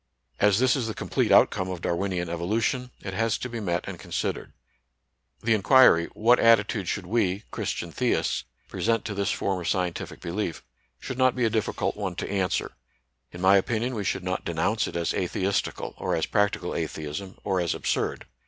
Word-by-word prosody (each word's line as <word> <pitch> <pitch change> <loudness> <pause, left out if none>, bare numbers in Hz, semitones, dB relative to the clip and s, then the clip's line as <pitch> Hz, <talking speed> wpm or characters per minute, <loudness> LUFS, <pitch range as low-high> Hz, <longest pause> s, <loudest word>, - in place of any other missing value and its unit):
As 105 -1 +4
this 130 +2 +4
is 125 -5 -1
the 110 - -4
complete - - 0
outcome 95 0 +4
of 90 -2 -5
Darwinian 90 0 -1
evolution, 110 +9 -1
it 95 - -5
has 115 +2 +1
to - - -4
be 120 -2 -5
met 90 -4 -2
and - - -6
considered. - - -3 0.9
The 115 - +3
inquiry, 110 -5 +6
what 120 +3 +4
attitude 110 -3 +4
should 100 0 -2
we, 100 -1 0
Chris - - -3
tian - - -5
theists, - - 0 0.2
present 115 0 0
to 105 - -3
this 100 0 -1
form 95 -2 -1
of 85 - -5
scientific 90 -2 -2
belief, 85 -1 -3 0.4
should 130 - -6
not 130 -1 +4
be 125 -2 +1
a 110 - +1
difficult 110 -3 -1
one - - -3
to - - -4
answer 95 -3 0 0.6
In 90 - -9
my 95 +1 +6
opinion, 115 +5 0
we 105 -4 -3
should 95 -1 -1
not 95 +1 -2
denounce 85 +7 0
it - - -7
as 85 -1 0
atheistical, 95 +1 -1
or - - 0
as - - 0
practical 100 -3 0
atheism, 80 +3 -5
or 95 -3 0
as 85 - 0
absurd. - - -1
100 Hz, 185 wpm, -26 LUFS, 90-115 Hz, 0.9 s, inquiry